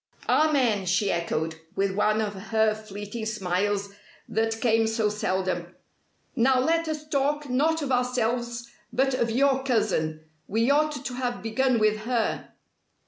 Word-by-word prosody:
"Amen!" 255 -11 +2
she 190 +3 +2
echoed, 160 -1 -2 0.2
with 195 0 0
one 215 +2 +2
of 210 -1 -2
her 220 +2 +1
fleeting 215 +1 -6
smiles 200 0 -1 0.4
that 225 +1 -1
came 225 -1 +3
so 220 -1 +1
seldom. 185 -4 -2 0.6
"Now 255 +1 +4
let 330 +5 +1
us 305 -1 -4
talk 290 0 0
not 305 +5 +1
of 275 - -3
ourselves 240 -1 0 0.2
but 265 +3 +1
of 235 -2 0
your 265 +3 +2
cousin. 160 -11 0 0.2
We 230 +5 +2
ought 300 -1 +1
to 250 - -3
have 245 -2 -3
begun 250 +3 +1
with 215 -1 +3
her!" 230 +1 -1
225 Hz, 140 wpm, -26 LUFS, 205-260 Hz, 0.6 s, Now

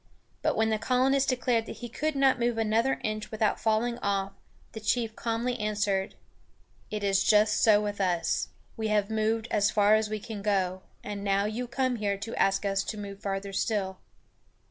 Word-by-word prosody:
But - - +1
when 220 0 +2
the 215 - 0
colonist 265 +3 +2
declared 245 -3 +1
he 240 - -7
could 305 +6 -2
not 270 -2 +3
move 235 -1 0
another 225 +4 +1
inch 215 0 -3
without 215 -1 0
falling 230 +2 0
off, 195 -1 -1 0.4
the 220 - -7
chief 220 +1 0
calmly 235 +2 -2
answered: 205 -2 -1 0.7
"It 210 -1 -4
is 195 -1 +2
just 210 0 +4
so 215 -2 +6
with 205 -1 -3
us. 175 -3 0 0.3
We 220 -1 -2
have 210 0 +1
moved 220 +1 0
as 205 0 +3
far 210 0 +4
as 215 0 +2
we 215 0 -3
can 215 -1 -7
go, 190 -2 0 0.2
and 205 -1 -5
now 200 0 +2
you 230 +4 -3
come 255 0 0
here 200 -2 -1
to 225 +3 -6
ask 195 +1 +2
us 195 0 +1
to 215 - -4
move 200 -1 -7
farther 195 0 -3
still." 190 -2 -1
215 Hz, 185 wpm, -28 LUFS, 200-230 Hz, 0.7 s, so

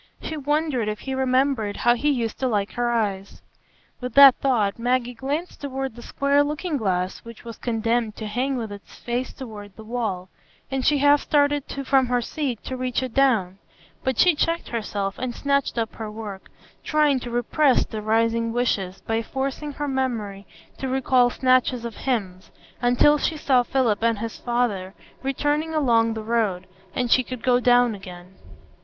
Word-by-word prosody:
She 315 - -5
wondered 295 -5 0
if 210 0 -3
he 265 - -4
remembered 260 -5 +1
how 240 - +4
he 275 +5 0
used 235 -6 -1
to 260 - 0
like 210 -3 0
her 240 0 -1
eyes; 200 -4 -2 0.6
with 250 -2 -6
that 280 -2 +10
thought 230 -7 +1
Maggie 245 +1 0
glanced 285 +8 -4
toward 270 -2 -4
the 240 - -10
square 280 +4 +2
looking 300 +3 -3
glass 185 -6 -1
which 230 -1 -12
was 230 -2 -8
condemned 230 -1 -1
to 220 - -6
hang 255 +5 -1
with 225 -3 -4
its 200 0 -11
face 245 +2 -3
toward 210 -6 -10
the 220 - -11
wall, 215 -6 -3 0.4
and 265 -1 -1
she 295 - +3
half 285 +1 +4
started 290 -1 +2 0.2
from 265 -1 +3
her 245 0 +1
seat 250 -1 -3
to 260 - -5
reach 255 0 -2
it 255 -3 -5
down; 220 -9 +2 0.4
but 260 -3 -1
she 360 -1 +5
checked 330 +3 -1
herself 205 -4 -3
and 255 -2 -3
snatched 280 -3 0
up 225 -1 -1
her 220 -1 -6
work, 210 -3 -8 0.3
trying 300 -3 +2
to 245 - -7
repress 245 +3 +2
the 215 -2 -6
rising 230 +1 +1
wishes 200 -6 -1
by 225 0 0
forcing 275 +4 -4
her 290 +1 -4
memory 230 -7 -3 0.3
to 265 - -3
recall 255 -1 +3
snatches 255 -1 +2
of 235 - -5
hymns, 195 -8 -3 0.3
until 245 +5 +4
she 315 - -1
saw 265 -4 +3
Philip 245 -4 0
and 230 -1 +2
his 225 +2 -6
father 220 -6 -1 0.3
returning 295 +4 -1
along 230 -6 +2
the 220 - -5
road, 215 -5 0 0.3
and 245 -1 -1
she 255 - +6
could 255 -2 -7
go 250 -1 +4
down 245 -1 +4
again. 185 -2 -11
245 Hz, 175 wpm, -24 LUFS, 220-270 Hz, 0.6 s, that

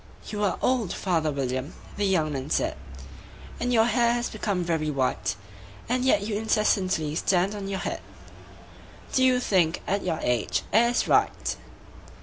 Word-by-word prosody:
"YOU 210 -1 -3
are 200 - +1
old, 245 -8 +1
father 165 -5 0
William," 130 0 -3 0.2
the 205 -1 0
young 160 -6 +1
man 135 +1 -4
said, - - 0 0.8
"And 245 - -1
your 225 -2 +5
hair 235 0 +3
has 240 0 -2
become 200 -4 -1
very 160 -3 -1
white; 130 -9 -1 0.5
And 250 +1 0
yet 260 -5 +3
you 210 +1 -3
incessantly 195 -8 +1
stand 185 +4 +1
on 200 -2 -5
your 195 -1 -3
head - - -3 1.1
Do 260 - +3
you 255 -1 +4
think, 180 -8 +1
at 200 +1 -1
your 170 -3 -1
age, 120 -3 0
it 235 +2 +5
is 245 - 0
right? - - +2
195 Hz, 160 wpm, -26 LUFS, 160-225 Hz, 1.1 s, your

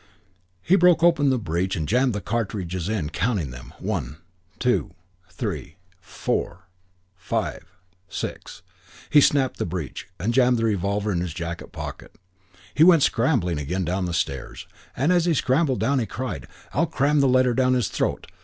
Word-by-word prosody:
He 180 - +4
broke 175 -3 +5
open 165 -5 +4
the 130 - +2
breech 95 -2 -1
and 80 -3 -3
jammed 125 +3 +2
the 105 - -3
cartridges 100 -6 -3
in, 90 -9 -2
counting 90 - -1
them, 60 +2 -10
"One, 80 - -3 0.4
two, 125 0 0 0.3
three, 80 - -5 0.2
four, 90 0 -3 0.5
five, 85 -1 -3 0.4
six!" - - -6 0.5
He 145 - +7
sapped 145 - +4
up 130 -2 0
the - - -2
breech 80 -5 -5
and 110 +7 0
jammed 125 -1 +4
the 115 - 0
revolver 100 0 0
in 85 -3 0
his 85 -4 -4
jacket 85 +1 -5
pocket. - - -8 0.6
He 155 - +5
went 165 -4 +7
scrambling 115 - +1
again 90 +6 -2
down 90 +3 -1
the 90 - -3
stairs, 70 -4 -3 0.3
and 140 +8 +2
as 175 -2 +3
he 170 -2 +2
scrambled 135 0 +1
down 140 0 +2
he 115 - -2
cried, 110 - -5 0.3
"I'll 165 +3 +2
cram 145 -1 +2
the 140 - +4
letter 130 -1 +4
down 130 0 +2
his 120 -6 +1
throat. - - -2
110 Hz, 170 wpm, -24 LUFS, 85-130 Hz, 0.6 s, He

